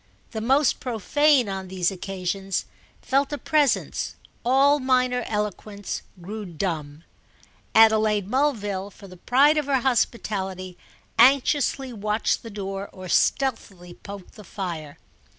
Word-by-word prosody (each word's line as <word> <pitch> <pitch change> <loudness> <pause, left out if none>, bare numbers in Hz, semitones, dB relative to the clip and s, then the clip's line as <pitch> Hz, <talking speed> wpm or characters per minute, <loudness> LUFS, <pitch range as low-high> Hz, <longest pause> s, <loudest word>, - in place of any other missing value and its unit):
The 220 - -4
most 270 +4 +2
profane, 260 +3 +2
on 190 -1 -4
these 180 -1 0
occasions, 195 0 -3 0.4
felt 275 +2 +1
a 290 - -2
presence; 295 -3 0 0.3
all 275 +4 +4
minor 255 -2 +1
eloquence 210 -1 -4 0.2
grew 210 +5 -6
dumb. 160 -4 -4 0.7
Adelaide 215 -2 +5
Mulville, 205 -7 -1
for 200 0 -14
the 185 - -12
pride 285 - +4
of 295 - -4
her 270 -2 +2
hospitality, 195 -7 -1 0.4
anxiously 270 +1 +3
watched 210 0 -1
the 230 - -9
door 195 -1 -5
or 185 -1 -10
stealthily 195 -11 0
poked 200 +1 -11
the 210 - -12
fire. 170 -6 -6
210 Hz, 120 wpm, -24 LUFS, 190-260 Hz, 0.7 s, Adelaide